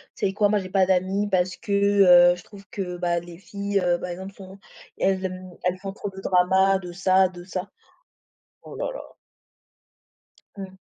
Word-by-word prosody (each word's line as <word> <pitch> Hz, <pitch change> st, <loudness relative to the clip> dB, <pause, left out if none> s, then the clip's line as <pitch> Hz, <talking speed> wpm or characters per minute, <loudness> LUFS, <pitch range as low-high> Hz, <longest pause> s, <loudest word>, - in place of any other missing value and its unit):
tu -, -, -2 dB
sais 190 Hz, -, -3 dB
quoi? 205 Hz, 0 st, +2 dB
Moi 210 Hz, 0 st, +2 dB
j'ai 185 Hz, -1 st, -7 dB
pas 190 Hz, -1 st, +3 dB
d'amies 190 Hz, +2 st, 0 dB
parce 180 Hz, -1 st, +1 dB
que, 205 Hz, -, -8 dB, 0.6 s
heu, -, -, -6 dB
je 180 Hz, -, -13 dB
trouve 200 Hz, -2 st, -15 dB
que, 180 Hz, -3 st, -5 dB
bah, 175 Hz, -1 st, 0 dB
les 170 Hz, 0 st, -12 dB
filles, 200 Hz, +1 st, -3 dB
heu, 175 Hz, -2 st, +1 dB
par 180 Hz, -, -6 dB
exemple, 190 Hz, +3 st, -7 dB
sont 190 Hz, 0 st, -12 dB, 0.4 s
elles 190 Hz, 0 st, 0 dB
aiment 185 Hz, 0 st, -6 dB
elles 180 Hz, 0 st, 0 dB
font 195 Hz, 0 st, -6 dB
trop 205 Hz, -1 st, -6 dB
de 195 Hz, 0 st, -11 dB
dramas 190 Hz, +1 st, +3 dB
de 180 Hz, -2 st, -8 dB
ça, 190 Hz, +1 st, +3 dB
de 175 Hz, -1 st, -11 dB
ça». 185 Hz, +2 st, -5 dB, 0.9 s
Oh -, -, -11 dB
là -, -, -3 dB
là. -, -, -8 dB, 1.6 s
Mmh. 190 Hz, -1 st, -8 dB
190 Hz, 195 wpm, -24 LUFS, 180-195 Hz, 1.6 s, pas